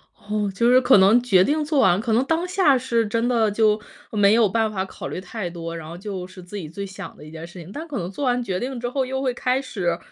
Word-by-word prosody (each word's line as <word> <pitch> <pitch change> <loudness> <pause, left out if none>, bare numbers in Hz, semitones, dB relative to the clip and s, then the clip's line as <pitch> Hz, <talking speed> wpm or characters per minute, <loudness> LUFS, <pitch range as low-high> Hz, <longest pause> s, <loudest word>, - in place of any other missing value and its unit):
哦， 205 -1 -3
就 235 +5 +2
是 250 +1 +7
可 255 -3 +6
能 200 +5 +6
决 190 -7 +5
定 300 +7 +1
做 300 -1 0
完 180 -7 +4
可 225 +1 -1
能 235 +4 +3
当 330 +4 0
下 360 -7 +3
是 235 -3 0
真 230 +3 0
的 230 -3 +2
就 215 0 +2 0.3
没 205 -1 +4
有 225 -1 +5
办 220 +2 0
法 190 -2 -2
考 - - -8
虑 - - -5
太 190 0 -5
多， 165 -1 -6
然 165 -2 -7
后 170 +2 -8
就 190 -2 -6
是 185 0 -13
自 180 +4 -8
己 175 -6 -6
最 200 +5 -6
想 195 -1 -9
的 - - -13
一 155 - -11
件 165 +1 -8
事 175 +1 -12
情。 170 +2 -10
但 315 +9 -7
可 290 -5 -5
能 175 0 -4
做 275 +8 -4
完 245 -1 +1
决 190 -5 -2
定 255 +2 -4
之 240 +1 -3
后 265 +1 -1
又 265 +1 -3
会 260 -2 0
开 255 +2 0
始 190 -10 -2
215 Hz, 305 characters per minute, -23 LUFS, 185-250 Hz, 0.3 s, 是